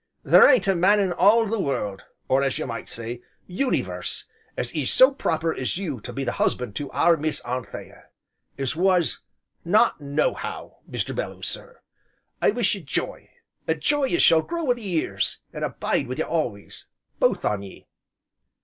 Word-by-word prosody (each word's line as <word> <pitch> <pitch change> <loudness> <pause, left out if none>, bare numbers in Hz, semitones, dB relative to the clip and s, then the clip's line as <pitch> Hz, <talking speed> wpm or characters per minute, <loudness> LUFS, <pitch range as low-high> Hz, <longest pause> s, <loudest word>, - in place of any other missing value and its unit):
There - - +7
ain't 240 -9 +4
a 195 - +4
man 190 +4 +4
in 190 -3 +1
all 215 +6 +5
the 220 +1 -2
world, 105 - -2 0.2
or 135 +1 +3
as 135 -2 0
you - - -3
might 115 -2 -6
say, 115 +1 -6 0.2
uni 250 +9 0
verse, - - -6 0.3
as - - -2
is - - -1
so 260 +2 +6
proper 165 - -1
as 130 +5 -2
you 155 - -4
to - - -7
be 135 - -4
the 125 - -1
husband 115 -5 0
to 145 - -4
our 170 0 +4
Miss 155 0 -2
Anthea 125 0 -7 0.5
as 135 +1 -2
was, 180 0 +2 0.4
not 205 0 +3
nohow, 145 +1 -2
Mr. - - -3
Belloo - - -5
sir. 485 0 -6 0.6
I - - +5
wish 220 -2 +1
you 200 - -5
j'y, 140 - -4 0.4
a 160 - +2
j'y 285 - +1
as - - +3
shall 160 -1 +6
grow 340 - -4
wi' 255 -5 +3
the 240 - -11
years, 180 -7 -2
an' - - -6
abide 135 - -1
wi' 130 - -4
you 160 - -1
always, 120 -12 -4 0.3
both - - +2
on 105 -1 0
ye." 100 -1 -12
165 Hz, 180 wpm, -24 LUFS, 135-205 Hz, 0.6 s, There